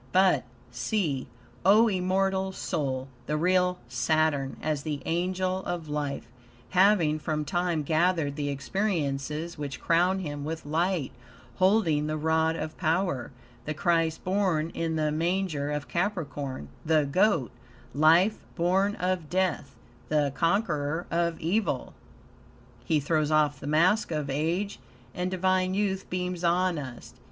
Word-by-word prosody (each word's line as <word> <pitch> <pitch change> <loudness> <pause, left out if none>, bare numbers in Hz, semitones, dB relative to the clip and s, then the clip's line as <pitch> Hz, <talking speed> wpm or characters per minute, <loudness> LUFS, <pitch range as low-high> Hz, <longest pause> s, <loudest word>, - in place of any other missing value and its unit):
But 185 -8 +4 0.3
see, 135 - -1 0.4
O 215 +4 +6
immortal 190 0 0
soul, 135 -8 -2 0.2
the 150 - 0
real 180 +2 +2
Saturn, 140 +2 0
as 150 -2 -1
the 150 -1 -3
Angel 185 +2 -1
of 170 -3 -4
Life, 150 -2 -3 0.4
having 180 -5 +4
from 150 -1 -2
time 175 -1 0
gathered 160 -1 +1
the 145 -1 -2
experiences 150 0 -2
which 140 -2 -5
crown 175 +3 +2
him 145 -6 -4
with 160 +1 -5
light, 165 0 0 0.5
holding 185 -6 +3
the 155 0 -1
rod 160 +1 +1
of 155 -1 -5
power; 165 -5 0 0.4
the 155 - -3
Christ 165 0 +1
born 185 -4 +1
in 165 -1 -2
the 155 -1 +1
manger 165 -2 -1
of 150 0 -3
Capricorn, 145 - -3
the 155 -2 +3
Goat 150 - +2 0.4
life 165 - +4 0.2
born 190 +4 +2
of 180 -4 -2
death; 175 -7 -1 0.3
the 150 -2 +2
conqueror 165 -1 0
of 170 -1 0
evil. 195 +7 -1 0.9
He 155 -2 +2
throws 150 +1 +1
off 150 -2 +2
the 140 - -7
mask 175 +8 +3
of 150 -4 -2
age, 170 +8 -1 0.3
and 180 +1 -2
divine 185 0 +1
youth 195 -2 -1
beams 180 -1 -3
on 175 -1 +2
us. 130 -4 -8
165 Hz, 130 wpm, -28 LUFS, 150-185 Hz, 0.9 s, O